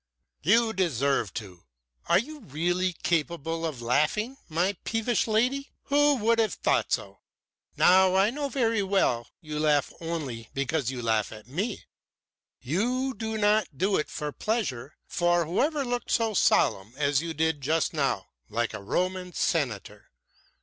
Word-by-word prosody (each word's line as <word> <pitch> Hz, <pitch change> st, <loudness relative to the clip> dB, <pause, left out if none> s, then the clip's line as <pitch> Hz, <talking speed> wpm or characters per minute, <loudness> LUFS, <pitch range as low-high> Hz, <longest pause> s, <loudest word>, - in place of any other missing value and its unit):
"You 225 Hz, +7 st, +3 dB
deserve 140 Hz, -, +1 dB
to. 95 Hz, -6 st, -8 dB, 0.4 s
Are -, -, +6 dB
you 295 Hz, +9 st, -3 dB
really 175 Hz, -, -1 dB
capable 165 Hz, 0 st, -1 dB
of 130 Hz, -7 st, -6 dB
laughing, 155 Hz, -, +1 dB
my 175 Hz, +5 st, +1 dB
peevish 225 Hz, +1 st, 0 dB
lady? 250 Hz, +6 st, +1 dB
Who 290 Hz, 0 st, +4 dB
would 230 Hz, -1 st, +2 dB
have 220 Hz, -1 st, +1 dB
thought -, -, +1 dB
so? -, -, -2 dB, 0.6 s
But 185 Hz, +1 st, +5 dB
I 195 Hz, +3 st, +4 dB
know 285 Hz, +2 st, -3 dB
very 230 Hz, -5 st, +1 dB
well 190 Hz, -12 st, +1 dB
you 150 Hz, -1 st, -5 dB
laugh 150 Hz, -2 st, +2 dB
only 145 Hz, -9 st, -4 dB
because 140 Hz, -1 st, 0 dB
you 130 Hz, -, -5 dB
can 120 Hz, -, -5 dB
laugh 110 Hz, -2 st, +1 dB
at 110 Hz, -1 st, -11 dB
me. 195 Hz, -, -3 dB, 0.8 s
You 245 Hz, -, 0 dB
do 220 Hz, -1 st, -4 dB
not 210 Hz, -7 st, +2 dB
do 195 Hz, +6 st, +2 dB
it 150 Hz, -, -2 dB
from 150 Hz, -2 st, -4 dB
pleasure. 155 Hz, -, -2 dB
For 175 Hz, -1 st, +1 dB
who 170 Hz, +4 st, 0 dB
ever 295 Hz, -1 st, 0 dB
looked 245 Hz, 0 st, -3 dB
so 225 Hz, -2 st, +1 dB
solemn 105 Hz, -, +2 dB
as 145 Hz, -1 st, +2 dB
you 165 Hz, -1 st, -5 dB
did 160 Hz, -1 st, 0 dB
just 155 Hz, +4 st, +1 dB
now -, -, 0 dB, 0.2 s
like 115 Hz, 0 st, -1 dB
a -, -, -6 dB
Roman 180 Hz, -, -2 dB
senator? -, -, -2 dB
175 Hz, 155 wpm, -27 LUFS, 145-220 Hz, 0.8 s, Are